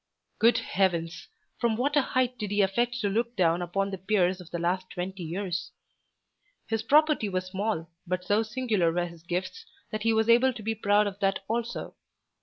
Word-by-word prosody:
Good 230 +2 +5
heavens! 170 -4 -1 0.3
From 230 -2 +1
what 285 +4 0
a 290 - +6
height 255 -1 0
did 210 -2 -3
he 205 0 +3
affect 235 +5 +1
to 205 - +1
look 235 +4 -1
down 175 -2 +2
upon 195 +3 -1
the 195 - -5
peers 185 -1 +1
of 175 - -13
the 170 - -3
last 180 +2 -1
twenty 185 +1 -5
years. 180 +2 -3 1.0
His 225 -1 -1
property 295 -2 +3
was 185 -1 -2
small, 190 -2 -2 0.2
but 180 +1 -2
so 205 +3 +3
singular 220 -6 0
were 175 +1 0
his 170 -2 -11
gifts 180 - -4 0.3
that 215 -1 -3
he 225 +1 +2
was 220 0 +2
able 240 +3 +5
to 225 -3 -9
be 225 +2 0
proud 210 -1 +3
of 200 -1 -4
that 195 -1 +1
also. 235 +1 -3
200 Hz, 195 wpm, -28 LUFS, 180-225 Hz, 1.0 s, a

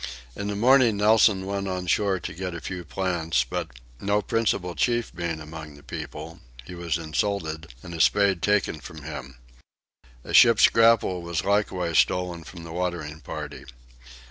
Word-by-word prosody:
In 100 - -4
the 105 - -2
morning 120 0 +5
Nelson 105 -2 +4
went 100 0 -3
on 90 -1 -3
shore 95 +1 +1
to 80 - -6
get 90 +1 -5
a - - -5
few 90 +2 -6
plants 85 -7 0
but, - - -4 0.3
no 100 +1 0
principal 100 -5 0
chief 120 - 0
being 85 -2 -3
among 75 -1 -9
the 70 - -16
people, 80 +4 -7 0.3
he - - -9
was 85 -2 -2
insulted, 80 -2 -2
and 85 - -8
a 80 - -1
spade 100 +4 +3
taken 105 -6 +1
from 80 -1 -10
him. 70 -4 -8 0.9
A - - -7
boat's 115 -1 +7
grapnel 115 -5 +4
was 85 -1 -3
likewise 95 -5 +1
stolen 90 -2 0
from 85 +2 -11
the 85 -1 -8
watering 85 -4 -3
party. - - -7
90 Hz, 165 wpm, -25 LUFS, 80-100 Hz, 0.9 s, boat's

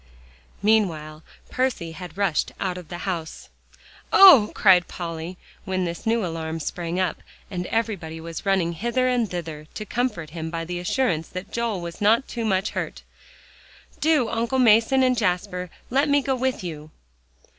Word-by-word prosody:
Meanwhile 165 -8 +1 0.3
Percy 255 -10 -1
had 175 +1 -9
rushed 195 -7 0
out 185 -2 -1
of 180 -3 -9
the 175 +1 -7
house. 170 -4 -4 0.6
"Oh!" 310 - +9
cried 185 -3 +5
Polly, 170 0 -6 0.3
when 185 -1 -1
this 170 +5 -5
new 225 -2 +2
alarm 165 -1 -4
sprang 170 +3 -3
up, 185 -4 -1 0.3
and 180 -1 -3
everybody 195 -8 -2
was 165 0 -7
running 190 -4 +1
hither 240 +8 0
and 245 -4 +1
thither 160 -4 -6
to 215 - -5
comfort 210 -10 -2
him 160 -1 -5
by 165 0 -4
the 175 +1 -4
assurance 175 -3 0
that 185 +2 -8
Joel 230 -5 -2
was 170 +4 -7
not 225 +6 +2
much 210 -4 0
hurt, - - -5 1.0
"do, 305 -6 +3
Uncle 230 +4 -1
Mason 240 +2 +5
and 255 -1 +3
Jasper, 180 -3 -1 0.2
let 280 +3 +2
me 285 -1 +3
go 265 - 0
with 260 -4 -1
you." 155 -3 -7
185 Hz, 155 wpm, -24 LUFS, 170-230 Hz, 1.0 s, Oh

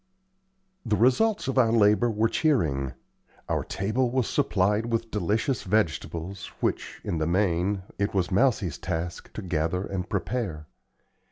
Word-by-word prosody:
The 110 -3 +1
results 135 - +3
of 135 0 +1
our 115 -3 +4
labor 110 +1 +4
were 110 0 +2
cheering. 80 - +1 0.5
Our - - 0
table 110 +6 -1
was 125 -3 0
supplied 105 -4 +1
with 115 -1 -2
delicious 105 - 0
vegetables, 95 -2 -1
which, - - -2
in 85 - -2
the 80 - 0
main, 95 +1 +1 0.2
it 100 - +1
was 95 -3 0
Mousie's 100 - +2
task 85 +1 -4
to 110 - -6
gather 85 +1 -1
and 95 -1 -4
prepare. 100 -11 -2
105 Hz, 140 wpm, -26 LUFS, 90-115 Hz, 0.5 s, our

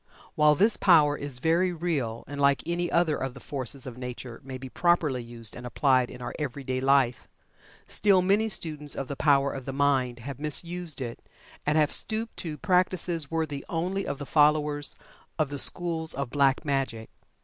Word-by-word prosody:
While 150 -1 +4
this 210 +7 +3
power 155 -6 +5
is 140 -3 -2
very 165 +6 +2
real, 150 -10 -2
and 145 0 -6
like 140 0 +3
any 175 0 -1
other 170 -3 +2
of 135 -1 -4
the - - -9
forces 135 -1 -2
of 125 -1 -8
nature 125 -1 -7
may 130 -1 -7
be 130 +1 -8
properly 155 -3 +1
used 115 -2 -8
and 120 - -9
applied 130 0 +2
in 125 - -9
our - - -5
every 140 -2 -4
day 130 -1 -2
life, 135 -3 +2 0.6
still 195 -3 +3
many 205 +4 +2
students 150 -7 -2
of 135 - -4
the 140 - -5
power 140 -1 +3
of 135 -2 -7
the 135 - -3
Mind 135 -3 +1
have 130 +3 -8
misused 165 0 -3
it 120 -2 -5 0.5
and 150 +1 +3
have 150 -1 +3
stooped 220 +1 +1
to 155 -3 -4
practices 180 -4 +1
worthy 155 -4 -2
only 180 +4 -2
of 140 - -3
the 145 - -6
followers 150 0 +2 0.4
of 155 -3 +1
the 145 -1 -5
schools 165 -1 +1
of 135 -3 -4
"Black 140 +1 +2
Magic." 135 -6 -2
145 Hz, 185 wpm, -27 LUFS, 130-165 Hz, 0.6 s, power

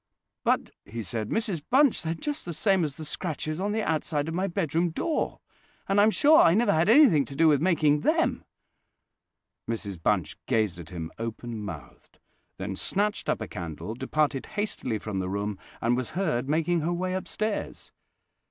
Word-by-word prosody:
"But," - - +1
he 115 +1 -6
said, 105 +3 -4
"Mrs 215 - -1
Bunch, 275 0 +4
they 160 - -4
are - - +1
just 295 - -4
the 170 -2 -5
same 195 -1 +2
as 145 -3 -2
the 160 - -7
scratches 155 0 -3
on 205 +1 0
the 220 +1 0
outside 155 -3 -1
of 165 - -3
my 185 +3 0
bedroom 170 -2 0
door; 310 - -2 0.5
and 195 +1 +4
I'm 210 - +6
sure 305 +7 +6
I 165 - +5
never 235 +3 +3
had 160 +5 +2
anything 235 - +7
to 135 - -9
do 165 +3 +4
with 145 -3 +4
making 155 -4 +3
them." 320 - +1 1.3
Mrs 100 -6 -4
Bunch 90 -5 0
gazed 110 -8 +1
at 80 - -9
him 85 -2 -6
open 115 -1 -5
mouthed, 100 - -10 0.4
then 95 +1 -4
snatched 205 - -1
up - - 0
a - - -3
candle, 85 +4 -6
departed 135 +2 -1
hastily 205 - -2
from 105 -2 -4
the 95 0 -2
room, 100 0 -3 0.2
and 120 +1 +2
was 125 -1 -3
heard 145 -9 0
making 165 +3 +2
her 165 +3 -1
way 185 +1 -2
upstairs. 210 +3 -3
155 Hz, 180 wpm, -27 LUFS, -, 1.3 s, anything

